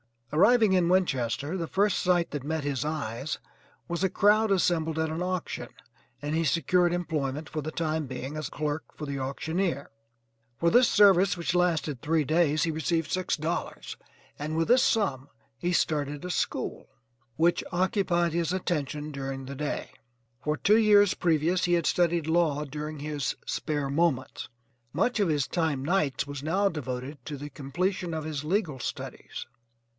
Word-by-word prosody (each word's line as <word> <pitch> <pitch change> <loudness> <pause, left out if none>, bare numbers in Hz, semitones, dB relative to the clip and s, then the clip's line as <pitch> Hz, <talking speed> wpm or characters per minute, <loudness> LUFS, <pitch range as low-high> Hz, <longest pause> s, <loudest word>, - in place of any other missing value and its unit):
Arriving 215 +5 +5
in 180 -2 +3
Winchester 150 -3 +1
the 165 -2 -3
first 200 +2 +2
sight 175 -2 +2
that 145 -3 -4
met 155 +1 -2
his 140 -1 -1
eyes 145 -3 -3 0.5
was 170 0 -2
a 190 - +2
crowd 210 +4 +4
assembled 165 -4 +1
at 160 0 0
an 160 +2 -3
auction, 180 -1 -3 0.5
and 145 +1 -3
he 165 +1 +1
secured 175 +4 +2
employment 155 -4 -2
for 155 - -3
the 155 - -4
time 155 -2 -2
being 130 +3 -5
as 155 -3 -4
clerk 150 +1 -2
for 150 - -6
the 140 -1 -4
auctioneer. 150 +3 -2 0.7
For 170 +5 +2
this 245 0 +6
service, 195 -2 +5
which 170 0 -1
lasted 165 -7 +1
three 160 0 +1
days, 155 0 +2
he 165 - +1
received 160 +1 -1
$6, 160 - -2 0.4
and 155 +2 -3
with 165 0 0
this 250 +1 +6
sum 145 - +1 0.3
he 175 - 0
started 145 -3 0
a 180 - -3
school, - - -2 0.5
which 170 +4 +2
occupied 180 -2 +1
his 170 +1 0
attention 150 -5 -2
during 135 -1 -5
the 135 - -6
day. 145 +1 -3 0.5
For 150 0 0
two 210 +7 +4
years 205 -3 +5
previous 170 +1 +1
he 175 - +1
had 170 -2 +2
studied 170 -2 +2
law 160 -3 +2
during 150 +1 -6
his 150 -1 -2
SPARE 145 -3 -2
MOMENTS; 145 -4 0 0.5
much 220 +9 +1
of 200 - +3
his 150 -4 +1
time 160 -6 -1
nights 150 -5 +1
was 145 -1 -6
now 190 +7 +2
devoted 135 -3 -5
to 150 -2 -5
the 145 +2 -7
completion 175 +5 -2
of 155 - -3
his 150 -2 -4
legal 165 -6 0
studies. - - -6
160 Hz, 165 wpm, -28 LUFS, 145-180 Hz, 0.7 s, this